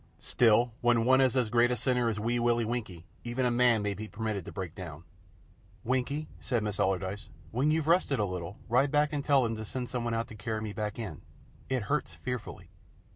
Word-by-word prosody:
Still, 120 0 +3
when 120 -1 +3
one 130 +1 +5
is 130 0 +3
as 120 -4 +1
great 120 0 +4
a 125 - +1
sinner 125 0 +1
as 105 -2 -2
Wee 120 +3 0
Willie 120 -1 +2
Winkie, 105 -8 -4 0.2
even 120 +2 -1
a 125 - +2
man 120 -3 +4
may 100 -1 0
be 110 +2 -6
permitted 105 -4 -3
to - - -7
break 95 -5 -5
down. 85 -4 -8 0.8
"Winkie," 130 +5 -1
said 120 -4 -1
Miss 105 -1 -3
Allardyce, 95 +1 -1 0.2
"when 130 +6 +2
you've 155 -1 +1
rested 165 -5 +3
a 105 - +1
little, 90 +1 -5
ride 125 +4 +3
back 150 +1 +2
and 145 -1 -1
tell 140 -3 +4
them 115 -1 -1
to 110 - -5
send 125 +4 -4
out - - -13
something 115 -2 -1
to 115 - -11
carry 110 -1 -1
me 105 -1 -4
back 105 -1 -3
in. 105 - -6 0.5
It 130 -3 0
hurts 145 +6 -1
fearfully." 125 -2 -6
120 Hz, 215 wpm, -30 LUFS, 105-125 Hz, 0.8 s, one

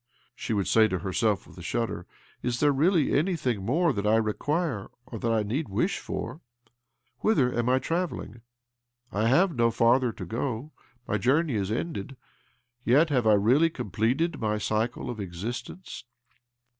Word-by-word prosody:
" - - -35
she - - -5
would 100 -3 0
say 110 -1 +5
to 95 - -1
herself 95 +4 0
with - - -16
a - - -8
shudder. 115 -2 -3 0.3
"Is 125 -1 -1
there 145 0 +4
really 155 +3 +2
anything 140 - 0
more 155 - +2
that 105 -2 -2
I 110 - +4
require, 115 - -1 0.2
or 115 -3 -7
that 115 - 0
I 110 -1 +2
need 130 +8 -2
wish 115 - 0
for? 160 - -5 0.8
Whither 135 - +2
am 120 +1 0
I 130 - +4
travelling? 160 - -3 0.7
I 105 +3 +1
have 170 +7 +3
no 115 -1 +3
farther 120 +2 +3
to 95 - -8
go— 120 - -3 0.4
my 105 - 0
journey 145 - +2
is 100 -2 -1
ended. 130 -1 -4 0.7
Yet 145 +6 +4
have 125 -5 +2
I 110 - +6
really 125 +11 +4
completed 125 - -1
my 105 -2 0
cycle 110 +3 -1
of 115 - -7
exist 100 +6 -5
ence 185 - -9
120 Hz, 170 wpm, -27 LUFS, 105-145 Hz, 0.8 s, I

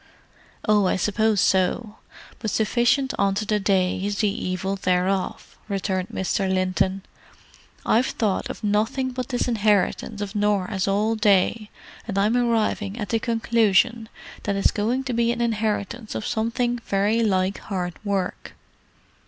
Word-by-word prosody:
"Oh, 210 -2 +4
I - - +1
suppose 210 +2 +1
so—but 210 +3 -2
sufficient 240 +6 +1
unto 200 +2 +1
the 210 0 +1
day 190 -2 +1
is 205 0 -2
the 210 - +2 0.2
evil 185 +2 -2
thereof," 185 0 -1
returned 190 -2 -1
Mr. 190 +1 -1
Linton. 185 +1 0 0.8
"I've 240 +4 +3
thought 210 -5 -1
of - - -7
nothing 220 +6 0
but 255 -1 -4
this 245 0 -1
inheritance 210 -1 +1
of 205 -1 -4
Norah's 205 -2 0
all 210 +3 +1
day, 210 0 +2 0.4
and 200 -3 -3
I'm 210 +4 +2
arriving 225 -3 0
at 210 -5 -4
the 225 - +1
conclusion 230 -1 +2 0.3
that 200 - -2
it's 195 - +2
going 235 +6 -1
to 260 -2 -3
be 235 0 +2
an 240 - -3
inheritance 220 -1 -2
of 110 - -3
something 240 +2 -1
very 210 +1 +1
like 190 -2 +1
hard 180 -4 -4
work!" 195 -3 -3
210 Hz, 140 wpm, -24 LUFS, 195-230 Hz, 0.8 s, Oh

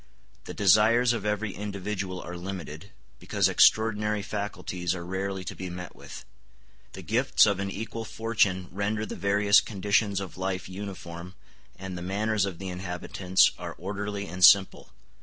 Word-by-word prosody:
The - - -7
desires 110 +5 +4
of 105 -3 -3
every 105 0 -1
individual 100 -2 -4
are 90 - -7
limited, 90 -1 -7 0.3
because - - +1
extraordinary 105 -1 +3
faculties 100 -4 -3
are 85 -1 -7
rarely 95 +1 -3
to 90 - -6
be 95 -1 -6
met 90 0 -8
with. - - -11 0.7
The 95 - -9
gifts 120 +9 +3
of 100 -2 +1
an 100 0 -2
equal 115 +3 -5
fortune 105 -5 0
render 105 +3 -2
the - - -6
various 100 +1 +4
conditions 100 0 0
of 95 -1 -8
life 95 -1 -3
uniform, 90 -2 -8 0.4
and 95 -1 -7
the 90 - -6
manners 105 +2 0
of 95 -4 -5
the 95 +1 -6
inhabitants 90 +1 +1
are - - -6
orderly 100 +2 -4
and 90 0 -5
simple. 95 0 +6
100 Hz, 155 wpm, -27 LUFS, 90-105 Hz, 0.7 s, simple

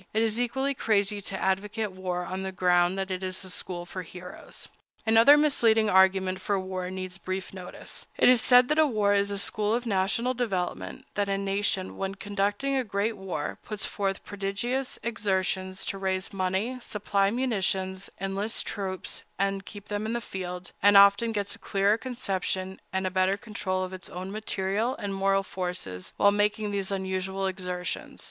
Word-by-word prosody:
It 220 - +4
is 225 +1 +1
equally 265 +3 0
crazy 205 -4 +1
to 190 0 -4
advocate 205 +3 0
war 180 -1 -3
on 185 +2 -4
the 190 0 -3
ground 180 0 +3
that 190 0 -2
it 185 0 -2
is 185 +1 -2
a 185 - -4
school 175 -1 -4
for 185 +1 -6
heroes. 180 +1 -10 0.4
Another 230 +6 +7
misleading 225 -8 +4
argument 190 0 +4
for 200 0 0
war 185 -1 -4
needs 185 0 -6
brief 185 0 -4
notice. 185 -2 -7
It - - +5
is 250 -2 +7
said 250 0 +6
that 310 +1 +5
war 215 -8 +2
is 200 0 +2
a 200 - -2
school 210 +2 +1
of 245 +1 -2
national 230 +4 +1
development—that 200 -2 -2
a 195 - +1
nation, 195 -1 -1
when 195 0 -3
conducting 205 +7 -1
a 260 - +2
great 205 +1 -1
war, 180 -6 -4
puts 210 -2 -4
forth 195 -1 -2
prodigious 205 +7 -2
exertions 190 -4 -1
to 195 - -3
raise 190 +1 -1
money, 195 +7 -1
supply 200 -3 +1
munitions, 195 -5 -1
enlist 195 +3 -1
troops, 190 -3 -4
and 195 0 0
keep 205 -1 -10
them 205 +1 -2
in 225 - -2
the 235 - 0
field, 180 -4 -6
and 205 0 +7
often 200 +3 +7
gets 205 -2 -2
a - - -11
clearer 200 +3 +2
conception 190 -6 -3
and 190 0 -1
a 185 - 0
better 185 +1 +2
control 195 -4 -2
of 185 0 -5
its 185 -1 -9
own 185 +2 -6
material 215 +3 -1
and 200 -1 -4
moral 195 0 +2
forces 180 - -4
while 200 - +6
making 210 +1 +1
these 195 -1 -1
unusual 190 0 -2
exertions. 180 -1 -4
195 Hz, 175 wpm, -28 LUFS, 185-215 Hz, 0.4 s, Another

